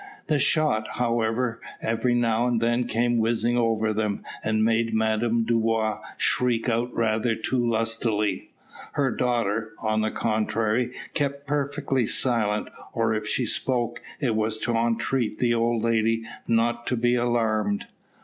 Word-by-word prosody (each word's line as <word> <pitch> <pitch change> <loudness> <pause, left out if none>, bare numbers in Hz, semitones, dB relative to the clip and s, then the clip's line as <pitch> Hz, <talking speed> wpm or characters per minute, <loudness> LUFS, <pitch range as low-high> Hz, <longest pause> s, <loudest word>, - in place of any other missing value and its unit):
The 150 -3 +1
shot, 145 -7 +2
however, 115 0 0 0.2
every 115 +2 0
now 120 0 +2
and 120 -2 +1
then 120 +1 +1
came 120 +1 +1
whizzing 115 +1 +2
over 110 -2 +1
them, 105 -1 -1 0.2
and 110 0 +1
made 115 0 +1
Madame 110 +1 +1
Dubois 115 -1 +1 0.2
shriek 125 -2 +1
out 120 +1 0
rather 115 0 +1
too 120 +3 -1
lustily. 115 -2 0 0.4
Her 135 -3 +1
daughter, 115 -3 -1
on 110 -1 0
the 110 - +1
contrary, 110 +2 0 0.2
kept 140 -1 -2
perfectly 140 -3 0
silent, 110 -4 +1 0.2
or 115 -1 +1
if 105 -1 -2
she 125 - 0
spoke, 120 0 0 0.2
it 125 -6 0
was 110 0 0
to 115 +2 -2
entreat 115 0 0
the 120 -1 +2
old 115 -1 +1
lady 115 0 +1 0.2
not 120 +1 +1
to 125 - 0
be 120 +1 +2
alarmed. 110 -4 +1
115 Hz, 140 wpm, -25 LUFS, 110-120 Hz, 0.4 s, shot